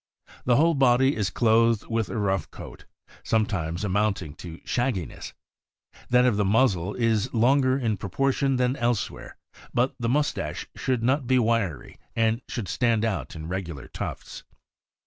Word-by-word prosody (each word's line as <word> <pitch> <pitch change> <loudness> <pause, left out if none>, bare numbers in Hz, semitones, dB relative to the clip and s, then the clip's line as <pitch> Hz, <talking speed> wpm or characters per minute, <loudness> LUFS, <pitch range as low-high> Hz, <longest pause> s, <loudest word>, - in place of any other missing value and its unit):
The 125 - +4
whole 165 +5 +4
body 130 -1 +3
is 105 -3 0
clothed 115 +2 +3
with 115 -2 -1
a - - -4
rough 95 -2 0
coat, - - -11 0.4
sometimes 95 -6 -1
amounting 100 -5 0
to 85 -2 -9
shag 120 0 0
giness; 85 -7 -7 0.8
that 125 0 +5
of 120 -5 +2
the 105 - +2
muzzle 100 -3 +2
is 115 -1 +1
longer 130 +3 +3
in 115 -6 -1
proportion 135 +8 0
than 125 +1 +1
else 120 -4 0
where; - - -11 0.4
but 125 +2 +2
the 115 -1 -1
mustache 135 - -1
should 125 -3 -1
not 130 +2 +1
be 130 0 +3
wiry, 110 - -1 0.2
and 115 +1 +1
should 115 -6 -4
stand 115 +2 +1
out 110 -5 -3
in 80 0 -7
regular 85 -7 -5
tufts. - - -7
115 Hz, 155 wpm, -25 LUFS, 100-125 Hz, 0.8 s, that